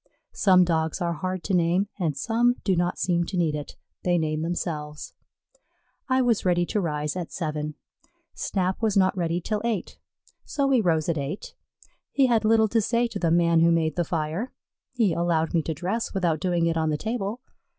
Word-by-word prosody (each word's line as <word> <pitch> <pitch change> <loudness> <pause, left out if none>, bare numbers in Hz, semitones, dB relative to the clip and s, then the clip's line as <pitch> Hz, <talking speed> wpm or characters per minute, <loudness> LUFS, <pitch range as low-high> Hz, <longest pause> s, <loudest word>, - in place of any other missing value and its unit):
Some 185 -3 +5
Dogs 160 -2 0
are 170 -1 0
hard 185 +2 -4
to 200 - -2
name, 180 +3 +2
and 155 -6 -1
some 240 - +2
do 190 - +2
not 175 +1 0
seem 175 -2 +1
to 185 - -4
need 165 -3 +1
it 150 -1 -6 0.3
they 175 -1 +2
name 155 -1 -1
themselves. 155 -3 -4 1.0
I 260 0 +3
was 235 -4 +2
ready 175 -1 +2
to 210 - -1
rise 150 -3 -2
at 180 -3 -5
seven. 150 -3 -3 0.6
Snap 185 0 -2
was 215 -3 +1
not 190 0 +3
ready 170 -1 0
till 210 +4 -2
eight, 225 -6 -3 0.4
so 280 -2 -1
we 265 -3 +3
rose 160 -5 +1
at 165 -3 0
eight. 140 +8 -5 0.6
He 275 - +3
had 235 -3 +2
little 220 0 +4
to 225 +2 +2
say 235 +3 +1
to 215 -3 -5
the 170 - +1
man 170 0 +4
who 165 +1 +5
made 160 -1 +1
the 175 - +1
fire. 165 +8 -2 0.4
He 225 -8 +1
allowed 165 -1 0
me 165 - +3
to 160 - -3
dress 195 +9 -3
without 170 -5 +1
doing 175 -1 +1
it 165 0 +1
on 160 -1 +1
the 150 - 0
table. 220 +2 -3
175 Hz, 195 wpm, -25 LUFS, 160-205 Hz, 1.0 s, Some